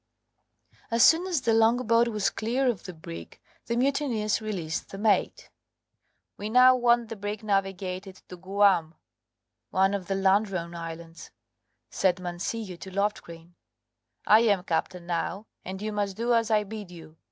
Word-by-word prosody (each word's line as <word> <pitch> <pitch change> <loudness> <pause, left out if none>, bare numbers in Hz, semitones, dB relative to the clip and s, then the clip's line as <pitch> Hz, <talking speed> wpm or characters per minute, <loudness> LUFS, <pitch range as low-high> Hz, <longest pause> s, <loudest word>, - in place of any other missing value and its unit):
As 230 0 +3
soon 340 +3 +5
as 345 -7 0
the 230 -2 +1
longboat 230 +1 +3
was 210 -3 0
clear 245 +5 -1
of 235 -7 -1
the 185 - -7
brig 85 - -10 0.3
the 235 - -1
mutineers 250 -6 0
released 180 -7 -4
the 195 - -8
mate. 205 -2 0 0.9
"We 210 - -5
now 255 +2 +7
want 240 -2 +2
the 225 - -5
brig 205 +1 -5
navigated 195 -2 -2
to 180 - -9
Guam" 185 -3 +2 0.7
(one 190 +1 +2
of 190 -3 -3
the 195 - -1
Ladrone 190 -3 +1
Islands), 165 -1 -8 0.6
said 185 -1 +1
Mancillo 180 +2 -5
to 190 - -9
Loftgreen; 180 -4 -4 0.7
"I 215 - +7
am 205 -5 +2
captain 175 0 -2
now, 175 +4 -3 0.2
and 190 +1 -6
you 215 - -2
must 205 -2 -2
do 235 +1 +1
as 230 -1 +2
I 215 -1 +3
bid 210 -2 -8
you. 165 -2 -13
200 Hz, 150 wpm, -27 LUFS, 180-225 Hz, 0.9 s, now